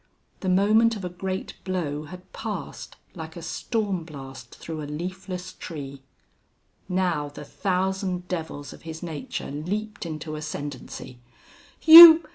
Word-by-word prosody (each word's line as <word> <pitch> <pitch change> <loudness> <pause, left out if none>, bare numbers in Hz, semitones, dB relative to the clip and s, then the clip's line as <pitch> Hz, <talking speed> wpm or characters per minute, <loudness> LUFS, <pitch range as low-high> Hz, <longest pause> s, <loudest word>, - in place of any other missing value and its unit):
The 190 - -2
moment 215 +5 +4
of 195 -3 -6
a - - -3
great 185 +2 -5
blow 155 -6 -3
had 180 +4 -12
passed, - - -6 0.2
like - - -8
a - - -8
storm 205 -6 -2
blast 135 -6 -10
through 160 -1 -7
a 145 - -6
leafless 180 +3 -6
tree. 140 -5 -8 0.9
Now 180 -5 0
the 145 +1 -10
thousand 185 0 -2
devils 160 -5 -5
of - - -14
his 160 0 -8
nature 160 -5 -5
leaped 210 +9 -4
into 155 -1 -6
ascendancy. 145 -4 -7 0.6
"You! 325 0 +12
180 Hz, 130 wpm, -25 LUFS, 150-190 Hz, 0.9 s, You